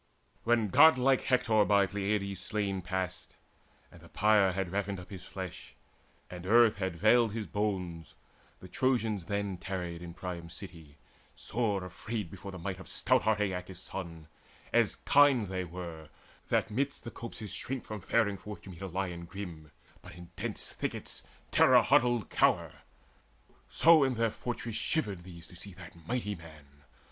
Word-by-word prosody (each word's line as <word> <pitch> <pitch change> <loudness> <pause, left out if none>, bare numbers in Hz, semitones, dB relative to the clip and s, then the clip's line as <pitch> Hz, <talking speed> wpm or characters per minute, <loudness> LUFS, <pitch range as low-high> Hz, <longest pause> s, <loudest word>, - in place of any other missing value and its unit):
When 115 -2 +3
godlike 135 - +6
Hector 120 -4 +3
by 100 -1 +4
Peleides 100 0 -2
slain 100 -1 -1
Passed, 90 0 -4 0.6
and - - -15
the - - -15
pyre 105 -3 +4
had 95 -1 -2
ravined 100 -1 -2
up 90 +2 -12
his 95 -2 -8
flesh, 95 -3 -7 0.5
And 90 0 -8
earth 115 0 +6
had 95 -3 -2
veiled 110 +4 +4
his 110 -2 -3
bones, 90 -6 -3 0.5
the 90 - -9
Trojans 110 -3 0
then 100 -1 -2
Tarried 90 -2 -4
in 85 -1 -8
Priam's 85 -2 -6
city, 85 -7 -10 0.4
sore 105 -3 -1
afraid 95 +1 -5
Before 100 0 -8
the 95 - -8
might 95 +2 -4
of 95 - -11
stout 130 -1 +2
heart 110 -2 +1
Aeacus' 95 -2 -3
son: 85 -4 -7 0.5
As - - +3
kine 140 -5 +5
they 95 -1 -3
were, 85 -3 -8 0.4
that - - +1
midst 140 +6 -2
the 120 - -7
copses 110 -3 -7
shrink 130 -1 -4
From 105 -2 -6
faring 100 0 +1
forth 105 +2 -9
to 95 - -9
meet 85 - -12
a 95 - -3
lion 90 -2 -3
grim, 85 -4 -8 0.3
But - - -12
in 90 0 -12
dense 105 +2 -3
thickets - - -3 0.3
terror - - +6
huddled 120 -6 +3
cower; - - +2 1.0
So 165 -2 +6
in 130 -2 +1
their 115 -1 +1
fortress 115 -1 -4
shivered 105 - -1
these 85 -2 -11
to - - -14
see 90 +2 -7
That 90 -1 -12
mighty 115 -4 -1
man. 75 -5 -14
100 Hz, 160 wpm, -31 LUFS, 90-110 Hz, 1.0 s, godlike